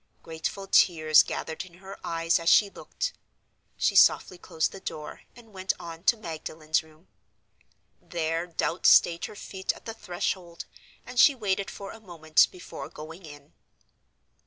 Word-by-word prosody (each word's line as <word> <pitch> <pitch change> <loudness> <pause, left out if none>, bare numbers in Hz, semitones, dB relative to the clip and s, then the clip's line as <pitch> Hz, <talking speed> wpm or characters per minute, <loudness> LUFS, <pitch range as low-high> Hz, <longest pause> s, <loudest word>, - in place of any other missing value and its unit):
Grateful 165 +4 -5
tears 155 -5 +5
gathered 160 +1 -5
in 180 -2 -16
her 190 +2 -10
eyes 165 0 +1
as 165 0 +1
she 200 -1 +5
looked: - - -5 0.6
she - - +1
softly 180 - +5
closed 160 -3 -1
the 195 - -9
door, 155 -5 -7
and 225 -3 -17
went 190 0 -1
on 165 0 -9
to 235 - +4
Magdalen's 155 -4 -3
room. 160 +2 -22 0.9
There 165 0 -2
doubt 165 0 0
stayed 170 0 +5
her - - -9
feet 190 -1 -3
at - - -16
the 225 - -5
threshold, 175 -4 -4 0.4
and 250 0 -4
she 280 - +7
waited 200 -4 -1
for 200 -1 -8
a - - -11
moment 165 -6 +2
before 180 - -9
going 160 +3 -10
in. 145 0 -14
170 Hz, 155 wpm, -27 LUFS, 160-195 Hz, 0.9 s, she